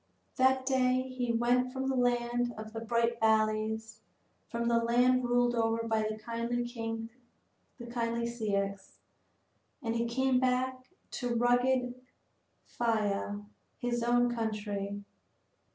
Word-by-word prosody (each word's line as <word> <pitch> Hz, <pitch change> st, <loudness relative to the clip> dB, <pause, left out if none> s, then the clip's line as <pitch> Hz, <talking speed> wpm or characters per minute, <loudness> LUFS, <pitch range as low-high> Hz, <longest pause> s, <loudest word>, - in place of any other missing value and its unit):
That 260 Hz, 0 st, +3 dB
day 255 Hz, -1 st, +2 dB
he 255 Hz, -2 st, -2 dB
went 245 Hz, +2 st, +2 dB
from 265 Hz, 0 st, -3 dB
the 265 Hz, -, 0 dB
land 240 Hz, -1 st, +1 dB
of 220 Hz, 0 st, -8 dB
the 225 Hz, -, -4 dB
bright 235 Hz, +1 st, 0 dB
valleys, 220 Hz, 0 st, +1 dB, 0.5 s
from 235 Hz, 0 st, -2 dB
the 235 Hz, 0 st, +4 dB
land 245 Hz, +2 st, +3 dB
ruled 245 Hz, 0 st, +3 dB
over 230 Hz, 0 st, 0 dB
by 220 Hz, -1 st, +1 dB
the 215 Hz, 0 st, -2 dB
kindly 235 Hz, +2 st, -2 dB
Ceyx, 230 Hz, -2 st, -4 dB, 0.9 s
and 230 Hz, -1 st, -1 dB
he 235 Hz, 0 st, +1 dB
came 260 Hz, +2 st, +2 dB
back 255 Hz, 0 st, 0 dB, 0.2 s
to 245 Hz, -2 st, -2 dB
rugged 245 Hz, +1 st, +2 dB, 0.7 s
Phthia, 205 Hz, -3 st, -1 dB, 0.3 s
his 240 Hz, -1 st, -1 dB
own 240 Hz, 0 st, +3 dB
country. 205 Hz, -3 st, -3 dB
235 Hz, 115 wpm, -31 LUFS, 225-245 Hz, 0.9 s, the